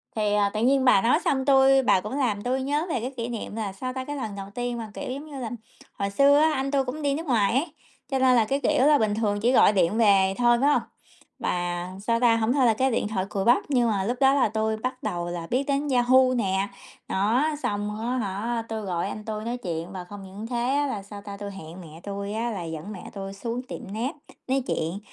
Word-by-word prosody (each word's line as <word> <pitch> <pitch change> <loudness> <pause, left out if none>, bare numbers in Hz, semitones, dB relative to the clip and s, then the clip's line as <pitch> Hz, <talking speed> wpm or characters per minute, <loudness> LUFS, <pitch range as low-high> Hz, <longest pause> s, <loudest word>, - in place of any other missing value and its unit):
Thì, 210 -2 +1
à, 205 -1 +3
tự 215 - -2
nhiên 265 +1 +3
bà 250 -6 +6
nói 245 +8 +3
xong 265 -1 +1
tui 270 -1 +5
bà 190 - +3
cũng 210 +8 -5
làm 215 -7 0
tui 255 +2 0
nhớ 290 +4 0
về 280 - 0
cái 250 +4 -4
kỷ 230 0 -2
niệm 230 -3 -5
là, 210 -4 -3
sao 255 +6 -5
ta, 260 0 -4
cái 290 - -5
lần 220 -7 -4
đầu 195 -1 -6
tiên 245 0 -2
mà, 220 -2 -6
kiểu - - -5
giống 280 +4 -6
như 290 -3 -8
là, 240 -3 -4 0.5
hồi 200 - 0
xưa 280 +7 +5
á, 315 +1 +4
anh 270 0 -1
tui 275 -2 +1
cũng 265 +5 -5
đi 285 -1 +1
nước 320 +4 -4
ngoài 225 -8 +2
ấy, 295 +5 0 0.4
cho 265 - +1
nên 260 -1 +5
là, 230 -2 +4
cái 275 +6 0
kiểu 265 -2 +2
là, 300 -1 +6
bình 215 -3 +1
thường 210 -2 0
chỉ 235 +4 +2
gọi 245 - +6
điện 195 +1 +2
về 195 -4 +4
thôi, 240 -1 +4
phải 280 - +4
hông? 295 - +3 0.6
Và, 175 0 -2 0.2
sao 230 0 +2
ta, 235 -2 +4
hông 225 +1 +1
thôi 270 -2 +3
là 230 - +5
cái 260 +4 +1
điện 225 - 0
thoại 195 -3 -2
cùi 195 -2 -2
bắp, 240 +2 +4
nhưng 245 -4 +2
mà 200 -3 0
lúc 240 +5 -2
đó 270 0 +5
là 275 -5 +3
tui 220 0 -1
bắt 255 +3 -4
đầu 175 0 -2
là 170 -1 -5
biết 255 +3 +1
đến 285 +1 0
Yahoo 255 0 +4
nè, 195 -4 0 0.4
đó. 225 +10 +1
Xong 205 +1 -2
á 230 - -3
hả, 225 +2 -2
tui 220 -1 -3
gọi 180 -4 -2
anh 215 - -7
tui 215 -1 -4
nói 240 +1 -2
chuyện 170 -5 -5
và 185 -2 -6
không 200 +2 -10
những 195 +3 -8
thế 245 +2 0
á, 290 0 +1
là 210 -7 -4
sao 200 0 -10
ta, 200 -1 -8
tui 200 0 -6
hẹn 180 -2 -10
mẹ 160 -1 -12
tui 200 0 -5
á 230 +2 -1
là 195 -5 -4
dẫn 160 +4 -6
mẹ 190 -4 -8
tui 195 -1 -6
xuống 230 +4 -4
tiệm - - -6
net 235 +6 -2 0.4
nói 265 0 +1
chuyện. 165 +5 -2
230 Hz, 265 wpm, -25 LUFS, 200-260 Hz, 0.6 s, bà